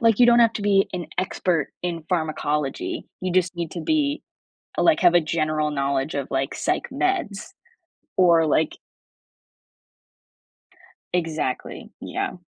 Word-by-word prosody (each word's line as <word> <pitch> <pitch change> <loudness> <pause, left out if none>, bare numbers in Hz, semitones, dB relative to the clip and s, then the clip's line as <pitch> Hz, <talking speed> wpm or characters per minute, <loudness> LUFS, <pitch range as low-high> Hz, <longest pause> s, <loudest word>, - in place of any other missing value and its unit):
like 230 -3 +4
you 245 - +7
don't 240 0 +6
have 230 -1 +5
to 210 - -4
be 200 -1 +3
an 180 -3 -4
expert 180 -4 0
in 170 -3 -3
pharmacology, 160 - -2
you 185 -1 -2
just 185 0 +2
need 170 -2 -4
to 170 - -5
be 290 - 0 0.6
like 330 -2 +4
have 175 -2 +5
a 175 - +7
general 155 -1 0
knowledge 140 0 -1
of 140 -2 -2
like 135 +1 -1
psych - - -1
meds 355 - -1 0.7
or 170 -3 +5
like 155 +1 +2 2.4
Exactly, 160 -7 -2
yeah. - - -3
175 Hz, 135 wpm, -23 LUFS, 155-200 Hz, 2.4 s, you